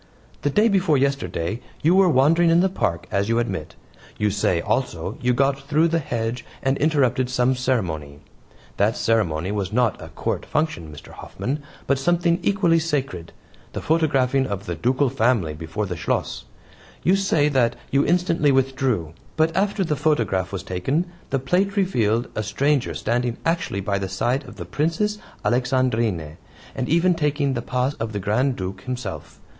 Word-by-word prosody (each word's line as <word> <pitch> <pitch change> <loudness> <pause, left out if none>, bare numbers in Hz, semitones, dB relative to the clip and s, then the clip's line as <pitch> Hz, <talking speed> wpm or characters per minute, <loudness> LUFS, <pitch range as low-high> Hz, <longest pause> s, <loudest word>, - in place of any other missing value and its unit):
The - - +1
day 210 +10 +4
before 190 -8 +3
yesterday 130 -7 -1 0.2
you 165 +4 +5
were 190 -1 +5
wandering 165 +4 +4
in 165 +1 +5
the 190 - +3
park, 85 - -1
as 100 +2 0
you 115 - +2
admit. 95 -10 -3 0.4
You 105 -1 +1
say, 95 -3 +1
also, 105 -2 -2
you 125 0 +2
got 135 +2 +2
through 155 +4 +2
the 165 0 +1
hedge 115 -3 -3 0.2
and 135 0 +2
interrupted 135 -4 +2
some 125 0 +2
ceremony. 80 - -2 0.6
That 105 +3 +2
ceremony 95 -6 +1
was 100 -3 -2
not 120 -1 +1
a - - -8
Court - - -3
function, 155 - -2
Mr. 75 - -12
Hoffman, 145 +4 -5 0.2
but 140 -1 +1
something 170 +3 +2
equally 175 -3 +3
sacred 135 - -2 0.4
the - - -3
photographing 140 -5 +2
of 100 0 -4
the 85 - -3
Ducal 125 - +1
family 115 - +1
before 80 +7 -4
the 90 -2 -4
Schloss. - - -2 0.6
You 185 - +4
say 195 -7 +2
that 130 -5 +2 0.2
you 140 +1 +3
instantly 165 -3 +2
withdrew. 130 - 0 0.2
But 160 +1 +2
after 200 +1 +1
the 155 -4 0
photograph 115 - 0
was 95 - -4
taken 130 - -1 0.2
the 135 - +1
plate 180 +10 0
revealed 120 - +1
a 110 - -2
stranger 135 +6 0
standing 120 +1 -1
actually 165 -12 0
by 100 0 -1
the 95 -1 -3
side 125 +9 -1
of - - -11
the - - -7
Princess 210 +8 -1 0.3
Alexandrine, 120 - 0 0.4
and 130 -2 -3
even 170 +3 +4
taking 145 -3 0
the 120 - -2
PAS 125 +3 -1
of 110 -1 -3
the 100 - -2
Grand 120 +7 +1
Duke 95 -1 -5
himself. 120 -12 -6
130 Hz, 170 wpm, -23 LUFS, 105-155 Hz, 0.6 s, you